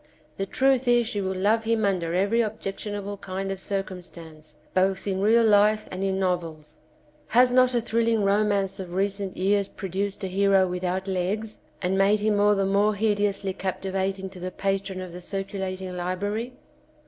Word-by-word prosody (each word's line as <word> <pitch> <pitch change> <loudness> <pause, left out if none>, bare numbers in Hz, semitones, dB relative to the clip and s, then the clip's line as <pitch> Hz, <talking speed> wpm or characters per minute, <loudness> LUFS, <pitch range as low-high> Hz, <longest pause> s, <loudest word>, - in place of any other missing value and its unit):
The 195 - -2
truth 265 +2 +2
is 240 -1 +4
she 220 -3 -2
will 190 0 -2
love 210 +4 +2
him 225 -1 +1
under 175 -4 0
every 200 +5 +2
objectionable 205 -1 -4
kind 195 0 -4
of 195 - -4
circumstance, 175 -6 -6 0.2
both 190 +1 +1
in 190 -1 -1
real 225 +3 +5
life 215 0 +4
and 185 +1 -4
in 190 -1 0
novels. 165 -5 -3 0.5
Has 245 +2 +4
not 255 0 +4
a 240 - +2
thrilling 230 -1 +1
romance 200 -1 +1
of 180 -2 -6
recent 200 0 -2
years 200 +1 +2
produced 195 +1 -4
a - - -1
hero 195 0 +3
without 180 +1 -2
legs, 195 +4 -2 0.2
and 190 +2 +1
made 200 +2 +4
him 210 0 +1
all 205 0 +4
the 195 -1 +1
more 200 +2 +2
hideously 205 -2 0
captivating 190 0 -2
to 185 - -10
the 180 +1 -4
patron 195 0 -2
of 180 -2 -9
the 180 - -8
circulating 190 -1 -4
library 205 +7 -3
195 Hz, 170 wpm, -25 LUFS, 185-210 Hz, 0.5 s, real